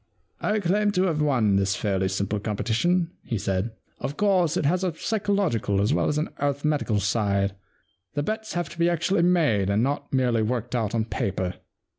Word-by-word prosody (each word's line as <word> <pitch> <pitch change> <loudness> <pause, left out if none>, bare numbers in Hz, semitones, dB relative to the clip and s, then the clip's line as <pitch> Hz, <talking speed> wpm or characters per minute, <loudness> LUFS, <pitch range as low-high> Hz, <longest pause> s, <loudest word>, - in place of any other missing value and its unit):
* - - -46
I 215 +1 +1
claim 205 +3 +2
to 185 - +2
have 165 -5 +1
won 120 -9 +3
this 95 -1 +1
fairly 95 -2 0
simple 100 +2 -1
competition,' 120 - 0
he 115 - -2
said. 95 +2 -1 0.2
* - - -40
Of 145 - -4
course, 185 -5 +2
it - - 0
has 180 +6 +2
a 180 -4 -1
psychological 195 - 0
as 100 +2 +2
v/ell - - +2
as 150 - 0
an 155 - -1
arithmetical 145 -5 0
side; 100 -1 +1 0.6
the 145 - 0
bets 220 +4 -3
have 175 0 -1
to 170 - -12
be 170 0 +4
actually 175 +3 +1
made 155 - +3
and 100 +3 +2
not 140 +3 -2
merely 125 -4 +2
worked 120 +2 -2
out 115 -2 0
on 110 -1 +1
paper. 95 -4 -2
135 Hz, 195 wpm, -25 LUFS, 105-175 Hz, 0.6 s, be